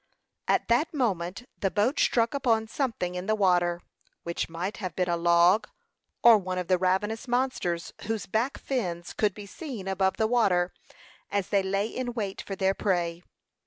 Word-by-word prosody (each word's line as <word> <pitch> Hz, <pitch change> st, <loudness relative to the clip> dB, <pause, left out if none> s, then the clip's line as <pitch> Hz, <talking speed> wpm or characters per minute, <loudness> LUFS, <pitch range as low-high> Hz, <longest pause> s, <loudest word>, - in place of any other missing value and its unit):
At -, -, +2 dB
that 245 Hz, +8 st, +2 dB
moment 195 Hz, -, -1 dB
the 195 Hz, -, +1 dB
boat 215 Hz, +9 st, +1 dB
struck 230 Hz, -1 st, +2 dB
upon 230 Hz, -5 st, +1 dB
something 225 Hz, -8 st, -2 dB
in 180 Hz, +2 st, -5 dB
the 215 Hz, -, +2 dB
water, 175 Hz, -3 st, +2 dB, 0.4 s
which 170 Hz, 0 st, -3 dB
might 175 Hz, +5 st, -4 dB
have 185 Hz, -6 st, -5 dB
been 180 Hz, -1 st, 0 dB
a -, -, +2 dB
log, 170 Hz, +5 st, +4 dB, 0.6 s
or 230 Hz, -2 st, +8 dB
one 185 Hz, -1 st, -4 dB
of 180 Hz, -1 st, -3 dB
the 185 Hz, -1 st, +3 dB
ravenous 210 Hz, +6 st, 0 dB
monsters, 240 Hz, -9 st, -1 dB
whose 220 Hz, -3 st, -2 dB
back 230 Hz, +7 st, -1 dB
fins 180 Hz, -10 st, -3 dB
could 210 Hz, -3 st, +1 dB
be 210 Hz, -, -8 dB
seen 230 Hz, -, -7 dB
above 190 Hz, 0 st, +1 dB
the 220 Hz, -, +2 dB
water, 195 Hz, -7 st, +2 dB, 0.6 s
as 200 Hz, -2 st, -1 dB
they 200 Hz, -1 st, +3 dB
lay 195 Hz, +1 st, 0 dB
in 245 Hz, +2 st, -4 dB
wait 205 Hz, -5 st, -3 dB
for 195 Hz, -, -6 dB
their 190 Hz, 0 st, +2 dB
prey. 175 Hz, -4 st, -1 dB
195 Hz, 175 wpm, -27 LUFS, 180-225 Hz, 0.6 s, or